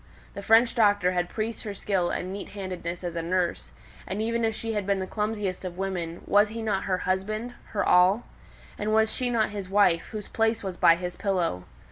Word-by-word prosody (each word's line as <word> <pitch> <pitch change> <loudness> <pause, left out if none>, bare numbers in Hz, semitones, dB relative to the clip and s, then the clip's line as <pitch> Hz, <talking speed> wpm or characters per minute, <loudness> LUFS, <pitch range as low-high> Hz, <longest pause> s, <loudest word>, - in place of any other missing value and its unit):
The 200 - -6
French 225 +3 +5
doctor 205 -5 +3
had 175 -1 -1
praised 225 +1 -3
her 205 -2 -6
skill 190 -3 0
and 185 +1 -3
neat 200 - -7
handedness 180 -2 -5
as 175 -1 -4
a 165 - -1
nurse, 175 +1 -1 0.4
and 190 +3 -3
even 230 +1 0
if 225 -1 +1
she 225 0 -3
had 205 -2 -2
been 200 -1 +2
the 190 - -2
clumsiest 210 -2 -2
of 180 -1 -6
women, 180 -3 -3
was 205 +1 +4
he 225 +1 -5
not 205 -3 -1
her 185 -2 +1
husband 215 +6 -2
her 205 - -2
all? 185 +5 +5 0.6
And 215 +1 0
was 220 0 +3
she 250 -1 -1
not 230 -3 +1
his 200 -3 -6
wife, 195 -4 +3
whose 210 -2 -6
place 225 0 0
was 190 -2 -4
by 165 - +6
his 180 0 -5
pillow? 175 - -1
200 Hz, 210 wpm, -27 LUFS, 180-220 Hz, 0.6 s, by